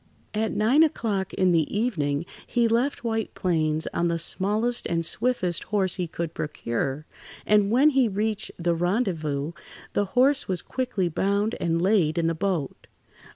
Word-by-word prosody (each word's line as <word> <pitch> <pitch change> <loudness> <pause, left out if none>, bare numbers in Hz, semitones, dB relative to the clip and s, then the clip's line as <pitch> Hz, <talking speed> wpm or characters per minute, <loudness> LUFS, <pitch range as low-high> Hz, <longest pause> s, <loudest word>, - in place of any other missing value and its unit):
At 220 +1 0
nine 240 +8 +3
o'clock 215 - 0
in 185 -1 +3
the 165 -3 +2
evening 155 -10 0 0.2
he 240 -1 +2
left 240 +5 0
White 225 -2 -2
Plains 160 -3 0
on 170 - +1
the 170 0 0
smallest 210 +8 0
and 165 -1 0
swiftest 200 -6 0
horse 195 -4 0
he 180 -2 -2
could 165 0 -4
procure, 135 0 -3 0.4
and 210 -1 +4
when 270 +7 +5
he 265 -3 +3
reached 210 +1 -2
the 170 0 0
rendezvous, 165 - -1 0.4
the 205 - +1
horse 275 +3 +4
was 185 -3 0
quickly 250 -8 -2
bound 200 +6 0
and 165 -1 0
laid 180 -4 +2
in 170 - +1
the 165 - +2
boat. 170 -4 -3
190 Hz, 155 wpm, -25 LUFS, 165-225 Hz, 0.4 s, when